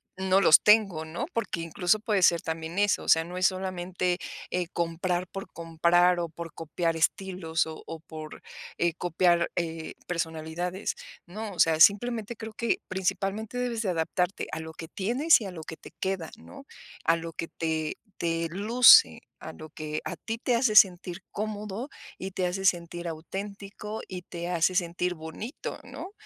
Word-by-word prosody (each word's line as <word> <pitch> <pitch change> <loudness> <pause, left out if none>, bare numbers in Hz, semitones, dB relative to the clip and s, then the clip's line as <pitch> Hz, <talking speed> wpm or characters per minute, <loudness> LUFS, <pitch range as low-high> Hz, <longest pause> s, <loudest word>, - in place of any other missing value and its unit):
no 190 +1 +2
los 160 - +8
tengo, 200 -7 +4
¿no? 170 +11 -4
Porque 200 -7 -2
incluso 175 +5 +1
puede 210 -3 0
ser 170 -1 +5
también 160 +2 -4
eso. 205 -2 +3
O - - -11
sea, 160 0 +6
no 175 +2 -9
es 185 +1 +4
solamente, 185 -1 -2 0.3
eh, 180 -2 -1
comprar 175 +1 -1
por 195 +1 -8
comprar 170 +2 +3
o 170 -1 -2
por 165 0 -8
copiar 165 +1 -2
estilos 170 -1 0
o 160 0 -8
o 165 -1 -6
por, 155 -1 -10 0.3
eh, 170 -1 +1
copiar, 175 0 +2
eh, 165 -2 -3
personalidades. 170 +2 -3 0.3
No, 205 +3 -6
o - - -12
sea, 160 -1 +4
simplemente 220 +4 +4
creo 220 0 -8
que 235 +1 0
principalmente 195 +4 -2
debes 245 -2 -1
de 200 - -1
adaptarte 180 +2 -1
a 160 - -3
lo 160 0 -8
que 165 +1 -8
tienes 245 - +3
y 210 - -5
a 190 - -5
lo 165 -3 -8
que 160 - -8
te - - -12
queda, 190 -4 -2
¿no? 275 +4 -13 0.4
A 165 - +5
lo 165 0 -6
que 165 - -4
te 160 -2 -2 0.2
te 165 0 -1
luce, 235 - +7 0.2
a - - -7
lo 155 - -11
que 155 0 -4
a 180 - -3
ti 225 +8 -5
te 240 +1 +1
hace 230 -3 +2
sentir 185 -2 +5
cómodo 215 +4 -4 0.3
y 190 +1 -5
te 185 -1 -1
hace 190 +2 -2
sentir 175 -1 0
auténtico 200 +5 -6
y 185 -2 -6
te 170 0 -6
hace 175 +1 +1
sentir 180 0 0
bonito, 160 - -7
¿no? 390 - -9
180 Hz, 175 wpm, -28 LUFS, 165-200 Hz, 0.4 s, los